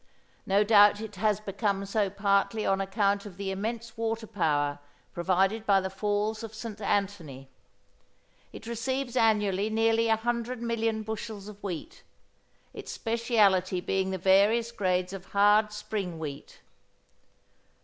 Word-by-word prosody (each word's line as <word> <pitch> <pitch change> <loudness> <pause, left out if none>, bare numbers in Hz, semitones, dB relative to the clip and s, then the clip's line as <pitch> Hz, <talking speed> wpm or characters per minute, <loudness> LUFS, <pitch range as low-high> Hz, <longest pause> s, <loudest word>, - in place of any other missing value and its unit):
No 200 +2 +4
doubt 205 -1 +6
it 215 -2 -8
has 210 +1 +1
become 200 -1 -2
so 200 0 0
partly 200 +2 +1
on 195 0 +1
account 200 +1 0
of 190 -3 -12
the 195 -1 -3
immense 225 +3 -4
water 225 0 -2
power 145 -9 0 0.3
provided 190 +5 +1
by 200 -2 +4
the 190 0 -4
Falls 210 +2 -1
of 225 -1 -8
St 220 -1 -7
Antony. 185 -10 -2 1.0
It - - -11
receives 245 +2 -3
annually 210 -3 +2
nearly 225 +1 +2
100 235 +2 -1
million 225 -2 -1
bushels 215 -1 -6
of 205 -1 -11
wheat, 200 - -6 0.7
its - - -8
speciality 210 -6 +1
being 190 +1 -1
the 190 - -2
various 205 +6 +3
grades 185 -4 -1
of 195 -1 -8
hard 210 +1 +4
spring 210 -4 -4
wheat. 145 -3 -8
205 Hz, 135 wpm, -28 LUFS, 195-225 Hz, 1.0 s, doubt